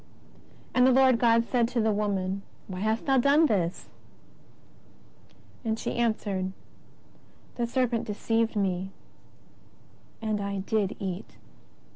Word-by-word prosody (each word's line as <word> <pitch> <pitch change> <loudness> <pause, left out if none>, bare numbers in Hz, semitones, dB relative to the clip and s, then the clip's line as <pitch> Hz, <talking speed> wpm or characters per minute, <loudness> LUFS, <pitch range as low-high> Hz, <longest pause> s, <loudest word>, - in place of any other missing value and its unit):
And 250 0 +5
the - - +5
Lord 260 -2 +5
God 230 -1 +4
said 235 -1 +1
to 245 0 -2
the 220 -1 +2
woman: 200 -2 -1 0.3
WTiy 185 - -5
hast 220 +3 -1
thou 270 -1 +4
done 285 +5 +5
this? 185 - -1 1.8
And 220 -1 -1
she - - -3
answered: 205 -5 -1 1.0
The 240 -1 -2
serpent 240 -2 0
deceived 225 +2 0
me, 190 -2 -1 1.3
and 215 -2 -2
I 200 -1 -3
did 205 0 0
eat. 190 0 -5
220 Hz, 120 wpm, -27 LUFS, 195-235 Hz, 1.8 s, And